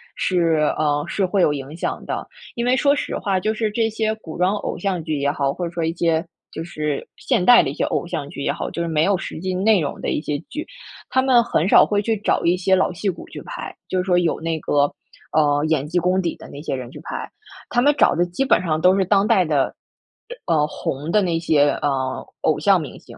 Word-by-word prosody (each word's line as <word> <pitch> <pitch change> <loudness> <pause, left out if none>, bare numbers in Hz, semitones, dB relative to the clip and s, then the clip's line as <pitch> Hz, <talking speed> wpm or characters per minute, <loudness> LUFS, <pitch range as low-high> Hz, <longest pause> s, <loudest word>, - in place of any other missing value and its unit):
是， 165 -4 +1
嗯， 145 -1 0
是 195 - 0
会 190 +1 +1
有 150 - +3
影 140 +1 -6
响 170 - -4
的。 - - -4 0.3
因 235 - -2
为 250 +1 +3
说 285 +1 +3
实 - - -3
话， 195 -2 0
就 215 +4 0
是 220 -1 -1
这 225 +1 +1
些 220 0 -1
古 170 -7 -10
装 180 +3 +2
偶 - - -4
像 190 -4 -2
剧 155 -2 -2
也 140 0 +1
好， 140 -2 -1
或 175 - -4
者 - - -8
说 170 -1 -2
一 160 - 0
些， 165 0 +1 0.3
就 160 - -5
是 150 -4 -3
现 240 -8 0
代 245 +4 +7
的 - - -2
一 - - -4
些 - - -2
偶 - - -1
像 160 -5 -4
剧 140 - -8
也 - - +1
好， - - -4
就 170 - -4
是 170 - -1
没 155 -2 +1
有 200 -1 +2
实 165 - -6
际 185 +2 -3
内 205 +2 +3
容 145 -4 -3
的 - - -2
一 - - -1
些 150 -2 -2
剧， 310 +2 -5 0.4
他 260 - +2
们 255 -3 +4
很 170 -6 0
少 - - +7
会 205 -1 0
去 225 +2 0
找 205 - 0
一 170 +1 +3
些 190 +1 +2
老 185 - +1
戏 195 +3 -2
骨 185 - -6
去 - - -8
拍， - - -7
就 185 - -2
是 180 - +1
说 180 -1 +2
有 170 -2 0
那 165 0 -2
个， 145 -1 +2 0.5
嗯， 145 -1 +3
演 150 -3 +1
技 170 - -2
功 180 +2 +2
底 170 -2 -2
的 - - -12
那 140 - -9
些 150 - -3
人 125 -2 -7
去 - - -10
拍。 - - -6 0.4
他 245 - +2
们 290 +3 +4
找 - - +5
的 175 - +2
基 180 +10 -2
本 - - +3
上 160 -4 -1
都 185 +2 +5
是 195 - +3
当 195 +1 +3
代 185 - +4
的 145 -4 +1 0.7
呃 170 - +2
嗯， 150 0 +2
红 145 0 -4
的 210 - +4
那 170 -4 0
些， 150 -3 +3
嗯， 130 -2 -1 0.2
偶 - - +1
像 - - +4
明 - - -8
星。 - - -14
175 Hz, 275 characters per minute, -21 LUFS, 150-200 Hz, 0.7 s, 代